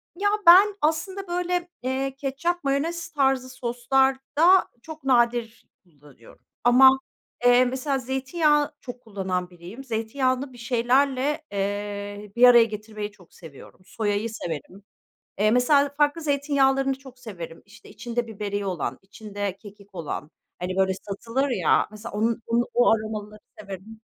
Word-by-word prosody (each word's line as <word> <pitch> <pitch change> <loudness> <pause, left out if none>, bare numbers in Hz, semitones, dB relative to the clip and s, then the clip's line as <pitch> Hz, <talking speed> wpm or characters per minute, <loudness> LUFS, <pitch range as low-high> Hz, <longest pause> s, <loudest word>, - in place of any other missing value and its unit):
Ya, 405 +3 +1 0.2
ben 390 +4 +8
aslında, 325 +6 -1
böyle, 355 0 -2
eee, 265 +1 -2
ketçap, 295 +6 -2
mayonez 310 +5 -1
tarzı 265 -3 +1
soslarda, 265 +8 +2
çok 315 +1 -10
nadir 240 -2 +1 0.2
kullanıyorum. 145 -8 -19 0.2
Ama, 250 +2 +8 0.6
eee, 245 +1 +6
mesela 260 +2 -1
zeytinyağı 290 +4 0
çok 245 -1 -9
kullanan 190 -5 -3
biriyim. 180 +9 -11
Zeytinyağını 255 +3 -2
bir - - -14
şeylerle, 260 +5 +1
eee, 205 0 -4
bir 240 - +2
araya 240 -2 +8
getirmeyi 215 -1 -6
çok 185 -5 -22
seviyorum. 155 -6 -14
Soyayı 210 +1 -2
severim. 185 -1 -7 0.6
Eee, 215 +1 +3
mesela 280 +4 +4
farklı 295 +2 +2
zeytinyağlarını 275 -2 +1
çok 265 -2 -15
severim. 170 -8 -9
İşte, 200 +2 -17
içinde 240 0 -4
biberiye 205 -1 -4
olan, 160 -9 -3
içinde 205 -1 -6
kekik 200 -2 -15
olan, 155 -2 -5 0.3
hani, 180 +1 -3
böyle 190 0 +2
satılır 230 +7 -2
ya, 195 -10 +2
mesela 215 +1 -9
onun 225 +3 0
onu 235 +1 +1
o 245 -1 +4
aromaları 215 -1 -4 0.2
severim. 200 +3 -9
240 Hz, 130 wpm, -24 LUFS, 205-275 Hz, 0.6 s, ben